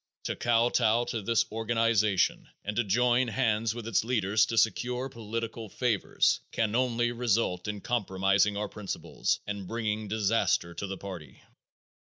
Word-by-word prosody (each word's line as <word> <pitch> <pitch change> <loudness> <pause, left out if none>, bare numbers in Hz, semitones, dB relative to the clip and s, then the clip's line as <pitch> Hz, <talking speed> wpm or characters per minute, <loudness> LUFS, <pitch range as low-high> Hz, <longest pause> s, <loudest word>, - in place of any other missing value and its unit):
To - - -2
kowtow 120 0 +2
to 115 - -2
this 115 +3 +2
organization 115 -3 +1 0.2
and 105 +1 -3
to 120 - +2
join 120 +4 +2
hands 115 -2 0
with 120 -2 -6
its 115 -3 +2
leaders 110 -3 +2
to 115 - -3
secure 125 +3 +1
political 115 -1 -5
favors 115 -2 +1
can 110 -2 0
only 120 -1 +1
result 115 -6 0
in 105 -1 -4
compromising 100 -3 +1
our 105 - -2
principles 105 -3 -3
and 100 -2 -5
bringing 110 -1 -2
disaster 105 -4 +1
to 100 +4 -5
the 95 0 -5
party. 85 -10 -9
110 Hz, 145 wpm, -29 LUFS, 100-120 Hz, 0.2 s, kowtow